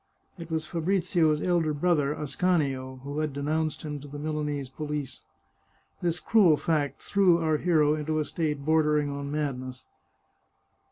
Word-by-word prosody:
It 165 Hz, 0 st, -8 dB
was 160 Hz, -1 st, -2 dB
Fabrizio's 165 Hz, -2 st, +1 dB
elder 170 Hz, -4 st, +1 dB
brother, 150 Hz, -3 st, +2 dB
Ascanio, 140 Hz, -5 st, -1 dB
who 145 Hz, +2 st, -4 dB
had 155 Hz, -2 st, -1 dB
denounced 155 Hz, +2 st, -1 dB
him 150 Hz, -2 st, -4 dB
to 145 Hz, -, -11 dB
the 145 Hz, +1 st, -8 dB
Milanese 150 Hz, -2 st, -3 dB
police. 145 Hz, -1 st, -5 dB, 0.8 s
This 175 Hz, -1 st, 0 dB
cruel 190 Hz, -9 st, +4 dB
fact 150 Hz, -3 st, -1 dB
threw 190 Hz, -4 st, +4 dB
our 160 Hz, -2 st, +1 dB
hero 155 Hz, -3 st, +3 dB
into 155 Hz, 0 st, -2 dB
a 155 Hz, -, 0 dB
state 150 Hz, -2 st, -2 dB
bordering 150 Hz, -2 st, +2 dB
on 140 Hz, 0 st, -5 dB
madness. 130 Hz, -4 st, -4 dB
150 Hz, 145 wpm, -27 LUFS, 145-160 Hz, 0.8 s, cruel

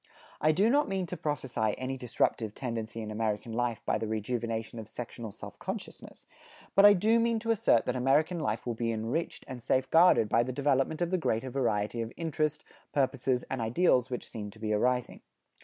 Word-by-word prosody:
I 155 Hz, -, +5 dB
do 190 Hz, +7 st, +3 dB
not 285 Hz, +5 st, +3 dB
mean 190 Hz, -1 st, -1 dB
to 180 Hz, -, -5 dB
prophesy 130 Hz, -9 st, -1 dB
any 130 Hz, +1 st, -3 dB
disruptive 115 Hz, -3 st, -1 dB
tendency 115 Hz, -3 st, -4 dB
in 110 Hz, -, -6 dB
American 110 Hz, +1 st, -2 dB
life 120 Hz, -1 st, -1 dB
by -, -, +1 dB
the 110 Hz, -, -3 dB
rejuvenation 115 Hz, +1 st, -3 dB
of 110 Hz, -1 st, -8 dB
sectional 120 Hz, -2 st, -7 dB
self -, -, -10 dB
consciousness; -, -, -7 dB, 0.5 s
but 195 Hz, -, +7 dB
I 205 Hz, -, +10 dB
do 220 Hz, +5 st, +3 dB
mean 230 Hz, 0 st, +2 dB
to 230 Hz, +1 st, -1 dB
assert 220 Hz, -, +3 dB
that 125 Hz, -, -1 dB
American 145 Hz, +7 st, +2 dB
life 110 Hz, -6 st, -2 dB
will 120 Hz, -, -1 dB
be 115 Hz, 0 st, -1 dB
enriched 115 Hz, +9 st, -3 dB
and 130 Hz, -2 st, -7 dB
safe 130 Hz, +3 st, +1 dB
guarded 165 Hz, -9 st, +6 dB
by 115 Hz, -, +3 dB
the 125 Hz, +2 st, -2 dB
development 140 Hz, +4 st, +1 dB
of 175 Hz, -, -2 dB
the 185 Hz, -, +1 dB
greater 130 Hz, -4 st, -1 dB
variety 115 Hz, -3 st, 0 dB
of 115 Hz, 0 st, -4 dB
interest, 155 Hz, -2 st, -1 dB, 0.3 s
purposes 130 Hz, -2 st, +1 dB
and 130 Hz, -2 st, -3 dB
ideals 125 Hz, +1 st, +2 dB
which 125 Hz, -2 st, -5 dB
seem 105 Hz, -2 st, -6 dB
to 100 Hz, -, -15 dB
be 110 Hz, -1 st, -1 dB
arising. 125 Hz, +3 st, 0 dB
125 Hz, 195 wpm, -30 LUFS, 115-155 Hz, 0.5 s, I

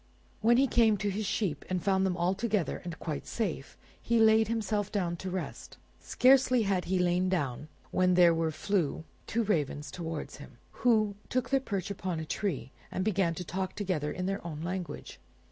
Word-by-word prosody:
When 235 Hz, +2 st, +5 dB
he 270 Hz, -, +5 dB
came 225 Hz, -5 st, +4 dB
to 205 Hz, 0 st, -1 dB
his 205 Hz, +1 st, -2 dB
sheep 200 Hz, -8 st, -1 dB
and 185 Hz, -2 st, -1 dB
found 190 Hz, -1 st, +2 dB
them 180 Hz, -1 st, -1 dB
all 175 Hz, +2 st, +2 dB
together 210 Hz, -3 st, -1 dB
and 175 Hz, -2 st, -6 dB
quite 150 Hz, -4 st, -5 dB
safe, 180 Hz, -, -3 dB, 0.2 s
he 235 Hz, -, +1 dB
laid 220 Hz, -1 st, +5 dB
himself 215 Hz, -2 st, -1 dB
down 180 Hz, -4 st, -1 dB
to 190 Hz, -, -5 dB
rest. 185 Hz, 0 st, -6 dB, 0.2 s
Scarcely 255 Hz, -2 st, +4 dB
had 195 Hz, -3 st, 0 dB
he 190 Hz, +1 st, 0 dB
lain 180 Hz, +1 st, +2 dB
down 145 Hz, -6 st, -2 dB, 0.2 s
when 185 Hz, -1 st, +3 dB
there 175 Hz, -2 st, +6 dB, 0.2 s
flew 160 Hz, -1 st, -1 dB, 0.2 s
two 230 Hz, +1 st, 0 dB
ravens 150 Hz, -7 st, -1 dB
toward 165 Hz, -2 st, -5 dB
him, 145 Hz, -4 st, -12 dB, 0.2 s
who 220 Hz, -4 st, +3 dB, 0.2 s
took 250 Hz, -1 st, -1 dB
their 270 Hz, -, +4 dB
perch 200 Hz, -7 st, -3 dB
upon 185 Hz, -4 st, -3 dB
a 160 Hz, -, -4 dB
tree, 155 Hz, -6 st, -3 dB, 0.2 s
and 185 Hz, -, -2 dB
began 190 Hz, -5 st, +1 dB
to 180 Hz, -, -5 dB
talk 185 Hz, +2 st, -4 dB
together 180 Hz, -8 st, -1 dB
in 180 Hz, -, -3 dB
their 195 Hz, +1 st, -2 dB
own 160 Hz, -2 st, -6 dB
language. 180 Hz, 0 st, -5 dB
190 Hz, 185 wpm, -30 LUFS, 170-215 Hz, 0.2 s, there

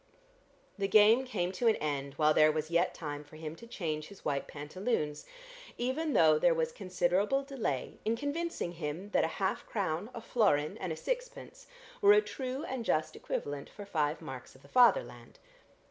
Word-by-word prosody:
The 195 Hz, -, +1 dB
game 215 Hz, +5 st, +6 dB
came 185 Hz, -8 st, -2 dB
to 190 Hz, +5 st, 0 dB
an 225 Hz, -, +5 dB
end 140 Hz, -2 st, -3 dB
while 155 Hz, 0 st, +4 dB
there 155 Hz, 0 st, +6 dB
was 155 Hz, +1 st, -3 dB
yet 170 Hz, +2 st, +2 dB
time 150 Hz, -2 st, -5 dB
for 150 Hz, +1 st, -16 dB
him 155 Hz, 0 st, -6 dB
to 235 Hz, -, -12 dB
change 155 Hz, -9 st, -3 dB
his 200 Hz, -, -15 dB
white 140 Hz, -2 st, -1 dB
pantaloons, 150 Hz, +1 st, -3 dB, 0.5 s
even 280 Hz, +5 st, -1 dB
though 155 Hz, -2 st, +5 dB
there 170 Hz, 0 st, +4 dB
was 160 Hz, -1 st, 0 dB
considerable 190 Hz, +7 st, 0 dB
delay 250 Hz, -, -3 dB
in 225 Hz, +1 st, +1 dB
convincing 285 Hz, -, -3 dB
him 170 Hz, +4 st, -5 dB
that -, -, +3 dB
a -, -, +2 dB
half 190 Hz, -, -1 dB
crown, 185 Hz, -1 st, -2 dB
a 230 Hz, -, -6 dB
florin 195 Hz, -11 st, +2 dB
and 185 Hz, -, -3 dB
a -, -, -2 dB
sixpence -, -, -5 dB, 0.3 s
were 410 Hz, 0 st, +8 dB
a 420 Hz, -, +6 dB
true 260 Hz, +2 st, -4 dB
and 260 Hz, -5 st, -4 dB
just 155 Hz, -7 st, 0 dB
equivalent 145 Hz, -1 st, -4 dB
for 205 Hz, -, -10 dB
five 155 Hz, -4 st, -1 dB
marks 130 Hz, -1 st, -8 dB
of 130 Hz, -, -19 dB
the -, -, -16 dB
Fatherland. 255 Hz, -, +3 dB
185 Hz, 180 wpm, -32 LUFS, 155-240 Hz, 0.5 s, were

